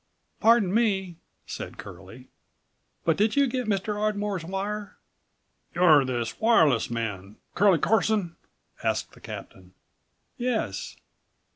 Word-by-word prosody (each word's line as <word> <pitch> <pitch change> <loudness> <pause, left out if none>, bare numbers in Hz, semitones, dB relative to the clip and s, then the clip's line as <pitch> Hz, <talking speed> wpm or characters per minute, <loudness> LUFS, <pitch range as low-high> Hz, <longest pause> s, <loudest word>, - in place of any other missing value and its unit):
"Pardon 225 -5 +4
me," 195 -6 0 0.3
said - - -7
Curlie, - - -12 0.8
"but - - +2
did 215 +2 +2
you 280 0 +4
get 250 -2 -2
Mr. 205 0 -1
Ardmore's 205 -3 -1
wire?" 200 +4 -4 0.8
"You're 160 -6 +6
this 120 -3 -3
wireless 160 - +3
man, 105 -4 -4 0.2
Curlie 195 -2 +4
Carson?" 210 -2 +1 0.5
asked - - -1
the - - -18
captain. 90 -1 -10 0.6
"Yes." 230 - -2
195 Hz, 110 wpm, -26 LUFS, 145-215 Hz, 0.8 s, You're